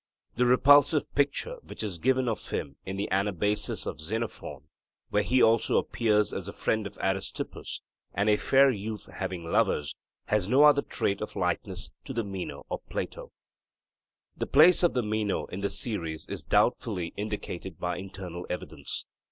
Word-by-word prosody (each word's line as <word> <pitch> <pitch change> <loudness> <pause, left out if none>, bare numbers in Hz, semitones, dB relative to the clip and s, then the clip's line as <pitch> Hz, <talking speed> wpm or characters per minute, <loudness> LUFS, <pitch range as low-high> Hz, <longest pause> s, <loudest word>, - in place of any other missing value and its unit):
The 125 0 +3
repulsive 145 +4 +5
picture 145 - 0
which - - -8
is 95 -6 -3
given 130 +4 +2
of 115 - -3
him 70 -1 -3
in 95 +1 -3
the 100 - -1
Anabasis 100 +1 0
of - - -5
Xenophon, 90 - -4 0.5
where 105 - +3
he 125 +4 +3
also 115 0 +4
appears 105 -3 +1
as - - -4
the - - -6
friend 110 -2 0
of - - -13
Aristippus 95 0 -3 0.3
'and 100 +2 +1
a 105 - +5
fair 135 +3 +5
youth 105 -1 -5
having 95 -3 -4
lovers,' 75 -3 +1 0.3
has 105 -2 0
no 135 +5 +6
other 150 -1 +7
trait 100 -7 -2
of - - -5
likeness - - -2
to - - -5
the 115 -2 -1
Meno 95 -3 -6
of - - -2
Plato. - - -5 1.0
The - - -3
place 160 +5 +6
of 175 -5 +3
the 125 - +2
Meno 105 -1 -1
in 95 - -7
the 100 - 0
series 95 -6 -3
is - - -6
doubtfully 85 -2 +1
indicated 100 -4 -5
by 90 0 -2
internal 90 -2 -7
evidence. 90 - -4
105 Hz, 165 wpm, -28 LUFS, 95-125 Hz, 1.0 s, other